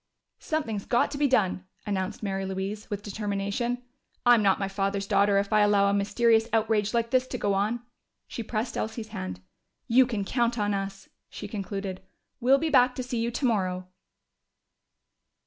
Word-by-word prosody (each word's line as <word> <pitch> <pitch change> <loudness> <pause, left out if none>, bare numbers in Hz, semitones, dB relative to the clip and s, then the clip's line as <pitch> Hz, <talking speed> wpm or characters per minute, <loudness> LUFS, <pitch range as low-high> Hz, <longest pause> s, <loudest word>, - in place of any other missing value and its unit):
"Something's 230 -11 -2
got 240 - +2
to 285 - -5
be 290 - +4
done!" 190 -7 +1 0.2
announced 190 -1 -3
Mary 195 -1 -2
Louise, 195 +3 -4
with 205 -1 -4
determination. 205 +4 -2 0.4
"I'm 240 -2 +7
not 195 -2 +3
my 195 - -2
father's 195 0 -1
daughter 200 0 +3
if 200 +2 0
I 215 - +5
allow 205 -1 +4
a 200 - +2
mysterious 220 +3 +3
outrage 220 -1 +1
like 230 0 0
this 255 0 +2
to - - -4
go 200 - 0
on." 215 +5 0 0.4
She - - -5
pressed 225 +1 -3
Elsie's 220 0 -4
hand. 95 - -6 0.5
"You 250 +2 +5
can 215 -5 -2
count 240 +1 0
on 205 -1 0
us," 195 0 -4 0.2
she 205 - -7
concluded. 195 -2 -5 0.4
"We'll 260 +3 +5
be 315 +2 -1
back 250 -2 +5
to 255 - -3
see 245 -1 -3
you 230 +1 0
tomorrow!" 190 -8 -1
210 Hz, 170 wpm, -27 LUFS, 195-235 Hz, 0.5 s, I'm